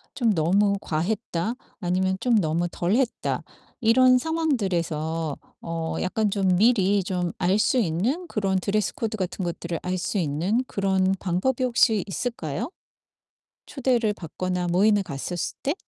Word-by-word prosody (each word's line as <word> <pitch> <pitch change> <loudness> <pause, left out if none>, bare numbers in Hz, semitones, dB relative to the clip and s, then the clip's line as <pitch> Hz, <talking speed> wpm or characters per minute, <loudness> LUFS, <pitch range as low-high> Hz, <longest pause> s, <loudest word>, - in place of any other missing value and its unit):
좀 235 -4 +2
'너무 195 +5 +3
과했다.' 180 +5 -2 0.2
아니면 185 0 0
좀 245 +2 +2
'너무 170 -1 +1
덜했다.' 225 +10 0 0.4
이런 255 +2 +5
상황들에서 175 - -1 0.2
어 165 -1 -3
약간 210 +3 0
좀 190 -2 +2
미리 205 -3 +3
좀 180 -2 -1
알 190 +2 +2
수 255 - +2
있는 235 - 0
그런 195 -3 0
드레스 200 +2 0
코드 220 -1 -3
같은 185 0 -3
것들을 170 0 -4
알 185 +1 -2
수 195 +3 -2
있는 175 - 0
그런 190 -1 +1
방법이 200 +9 0
혹시 235 -5 +3
있을까요, 200 - -3 1.0
초대를 245 -5 +1
받거나 180 0 -3
모임에 200 +3 +3
갔었을 170 +2 -4
때? 285 +4 0
190 Hz, 275 characters per minute, -25 LUFS, 175-225 Hz, 1.0 s, 이런